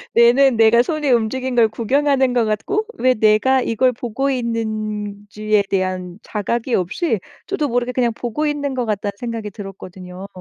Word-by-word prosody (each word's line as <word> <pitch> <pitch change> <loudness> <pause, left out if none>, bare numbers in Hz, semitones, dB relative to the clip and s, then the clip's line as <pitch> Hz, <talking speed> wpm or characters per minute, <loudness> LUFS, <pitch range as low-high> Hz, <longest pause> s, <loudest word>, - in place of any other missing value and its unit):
뇌는 240 +1 +5
내가 225 +1 +6
손이 305 +1 -2
움직인 250 +2 0
걸 230 -2 +5
구경하는 265 +3 +1
것 240 -2 +2
같고 310 - -1
'왜 255 0 +3
내가 220 +4 +3
이걸 250 +2 +2
보고 245 +3 -2
있는지에 215 -3 -2
대한 185 -1 -2
자각이 235 +4 -2
없이 215 - -1 0.3
저도 315 -7 -1
모르게 245 0 -1
그냥 245 -2 0
보고 240 +6 -3
있는 285 -2 -2
것 250 -2 -1
같다.'는 205 -1 -2
생각이 230 -3 -5
들었거든요. 190 -2 -9
230 Hz, 335 characters per minute, -20 LUFS, 210-260 Hz, 0.3 s, 내가